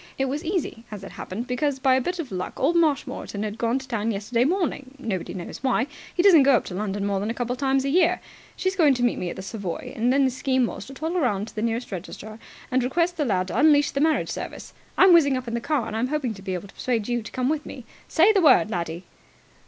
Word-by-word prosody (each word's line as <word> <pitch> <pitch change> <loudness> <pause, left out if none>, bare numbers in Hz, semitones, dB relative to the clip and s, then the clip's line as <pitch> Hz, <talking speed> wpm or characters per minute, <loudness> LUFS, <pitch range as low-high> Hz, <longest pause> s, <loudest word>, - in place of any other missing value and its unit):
It 270 - +1
was 285 +4 -3
easy, 340 - -2
as 205 -2 -8
it 195 - -8
happened, 220 +6 -6
because 270 +3 -1
by 265 0 +3
a 260 - +3
bit 355 +7 -2
of 315 -8 -5
luck 180 -1 -5
old 315 +6 +2
Marshmoreton 290 -9 0
had 215 +1 -5
gone 235 +2 +1
to 265 -1 -7
town 225 -3 -1
yesterday 230 +3 0
morning 295 -6 -1
nobody 215 -10 -4
knows 175 -2 -7
why: 255 -2 +2 0.3
he 350 - 0
doesn't 365 -7 +8
go 275 -1 +5
up - - 0
to - - -7
London 200 +1 -2
more 200 -1 0
than 205 +3 -2
a 230 - -2
couple 245 0 -2
of 250 - -8
times 270 -1 +1
a - - 0
year. 340 +3 +3 0.4
She's 375 +1 -1
going 305 -7 +4
to 245 - -2
meet 240 - +1
me 180 - -3
at - - -6
the 190 - -7
Savoy, 195 -4 -5
and 240 +3 +1
then 275 +1 +4
the 260 - +1
scheme 260 0 +1
was - - -6
to 270 - -10
toddle 325 +6 -2
round 215 - 0
to - - -18
the 215 - -2
nearest 230 +1 -2
registrar 205 +4 -7 0.3
and 255 0 +2
request 340 +7 +1
the 300 - 0
lad 185 -5 0
to - - -1
unleash 290 -1 +5
the 275 - -1
marriage 315 0 +2
service. - - -7 0.2
I'm 380 -1 +7
whizzing 285 -6 +5
up 255 -1 -6
in 230 - -4
the 235 - -1
car, 285 -3 0
and 215 - -5
I'm 230 +3 0
hoping 275 -5 -2
to 195 - -12
be 190 -1 -3
able 180 +3 -7
to - - -16
persuade 230 -5 -1
you 240 -1 0
to 215 - -10
come 255 -1 -1
with 300 +1 0
me. 255 -3 -9 0.2
Say 365 +7 +4
the 390 - +3
word, 290 -8 +5
laddie!" 170 -1 -3
250 Hz, 270 wpm, -24 LUFS, 215-290 Hz, 0.4 s, doesn't